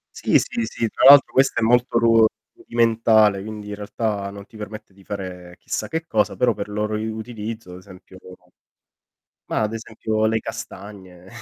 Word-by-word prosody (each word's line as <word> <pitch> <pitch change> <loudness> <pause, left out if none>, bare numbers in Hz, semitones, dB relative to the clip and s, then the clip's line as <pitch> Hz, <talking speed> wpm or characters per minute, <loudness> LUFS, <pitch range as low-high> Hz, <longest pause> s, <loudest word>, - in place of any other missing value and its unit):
Sì, - - +3
sì, 115 - -3
sì, 115 0 -3
tra - - 0
l'altro 140 0 +8
questa 135 -3 +2
è - - +1
molto 120 +1 +2
ru 115 -1 +5 0.3
rudimentale, 110 -3 +2
quindi 105 0 -8
in 105 - -5
realtà 105 -1 -3
non 100 0 -10
ti 110 - -16
permette 105 -1 -9
di 95 0 -20
fare 90 -3 -7
chissà - - -4
che 165 +1 -4
cosa, 110 -8 0
però 120 -2 +2
per 100 0 -6
loro 105 +1 -2
i 110 +1 -3
utilizzo, 110 -2 -7
ad 90 - -9
esempio 95 0 -15 1.3
ma - - -2
ad 110 +1 -1
esempio 110 -1 -2
le 110 +1 +1
castagne. 95 -4 -9
110 Hz, 175 wpm, -22 LUFS, 100-115 Hz, 1.3 s, l'altro